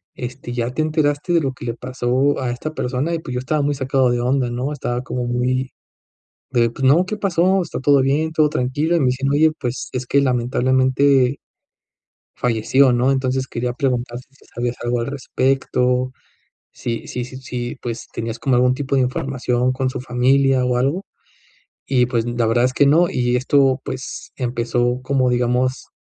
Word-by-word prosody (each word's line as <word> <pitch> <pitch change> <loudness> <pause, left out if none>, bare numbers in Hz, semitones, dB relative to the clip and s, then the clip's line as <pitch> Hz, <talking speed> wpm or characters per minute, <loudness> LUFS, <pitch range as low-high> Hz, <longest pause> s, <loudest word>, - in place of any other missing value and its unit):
este, 120 -1 -6
ya 120 0 -2
te 155 - -1
enteraste 155 +1 0
de 170 - +4
lo 135 - -1
que 130 - -10
le 115 - -2
pasó 130 +3 0
a 125 -2 -1
esta 155 +6 -5
persona", 135 +6 -2
y 165 - -1
pues, 130 -5 -7
yo 125 - -1
estaba 150 +4 -1
muy 145 0 0
sacado 130 -1 +1
de 120 0 0
onda, 125 0 +1
¿no?, 125 +4 -3
estaba 125 -4 -3
como 125 -1 -4
muy 125 +2 -1 0.8
de 120 -3 +2
pues: 135 +3 -5
"No, 155 +7 +5
¿qué 215 - -3
pasó? 190 -1 +2
¿Está 170 -6 -4
todo 140 0 +4
bien? 145 +4 +1
¿Todo 155 -1 +3
tranquilo?", 145 +6 0
y 170 - +3
me 135 - +2
dicen: 130 +2 0
"Oye, 155 +2 +4
pues, 125 0 -4
es 125 -1 -3
que 140 - +3
lamentablemente, 130 +1 +2 1.0
falleció", 125 +3 +3
¿no?, 125 +2 +2
entonces, 130 -1 0
quería 120 +1 -2
preguntar 125 -2 -2
si 135 +2 -23
sabías 120 0 -2
algo 120 0 0
al 115 - -3
respecto, 130 -2 0 0.6
si 115 -1 -4
si 125 - -3
si 130 - -10
si, 125 -2 -5
pues, 120 -1 -5
tenías 115 0 -4
como 130 -3 +1
algún 125 +1 +4
tipo 140 0 -3
de 135 - +4
información 125 -1 -1
con 130 0 -1
su - - -5
familia 130 +1 +2
o 125 -1 +1
algo, 140 +10 0 0.8
y 125 -2 +2
pues, 120 -2 0
la 120 -1 0
verdad 120 +2 +2
es 130 - +2
que 140 - +3
no. 165 +5 +4
Y 120 0 +1
esto 135 +1 +2
pues, 130 0 -6
empezó 120 0 -1
como, 130 -1 +1
digamos, 125 +1 0
130 Hz, 185 wpm, -20 LUFS, 125-140 Hz, 1.0 s, No